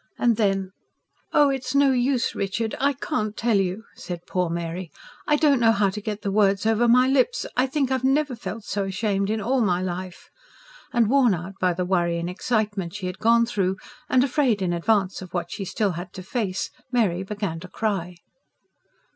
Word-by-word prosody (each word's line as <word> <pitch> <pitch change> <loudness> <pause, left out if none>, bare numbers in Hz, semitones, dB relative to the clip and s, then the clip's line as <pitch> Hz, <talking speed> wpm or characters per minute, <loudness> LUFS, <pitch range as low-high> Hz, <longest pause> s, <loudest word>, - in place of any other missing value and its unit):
And 235 -2 +3
then 195 -3 0 0.6
"Oh, 290 -1 +5
it's 265 0 -3
no 280 -1 +5
use, 255 0 +1
Richard, 205 +3 -2
I 280 +1 +2
can't 245 -7 -3
tell 230 -2 +2
you!" 195 +2 -1
said 175 -1 -7
poor 180 -2 -1
Mary. 170 +1 -4 0.4
"I 300 - +4
don't 290 -3 +3
know 225 -1 +5
how 200 -2 +2
to 210 - -6
get 210 0 -5
the 200 - -1
words 200 0 +2
over 225 +2 +3
my 250 +2 +5
lips. 275 - +2
I 255 +2 +2
think 270 -1 -1
I've 260 -1 0
never 270 0 +2
felt 225 -1 -6
so 200 -1 -2
ashamed 200 0 -1
in 220 +1 0
all 250 +5 +1
my 180 -5 +2
life." 185 0 -5 0.6
And, 235 -3 +3
worn 250 -4 +4
out 180 +3 -7
by 180 -1 +3
the 180 +1 -1
worry 175 -2 +1
and 170 +1 -3
excitement 205 -3 -1
she 200 -3 -5
had 180 0 -5
gone 235 +1 +4
through, 190 -5 -1 0.3
and 255 - +4
afraid, 255 -7 +1
in 175 -1 0
advance, 190 +2 +1
of 185 -1 -9
what 175 - -2
she 195 - -4
had - - -6
still 200 -1 0
to 180 +2 -7
face, 195 -2 -2 0.2
Mary 205 -8 +1
began 195 -4 -4
to 185 - -9
cry. 185 -3 -2
205 Hz, 195 wpm, -24 LUFS, 185-240 Hz, 0.6 s, Oh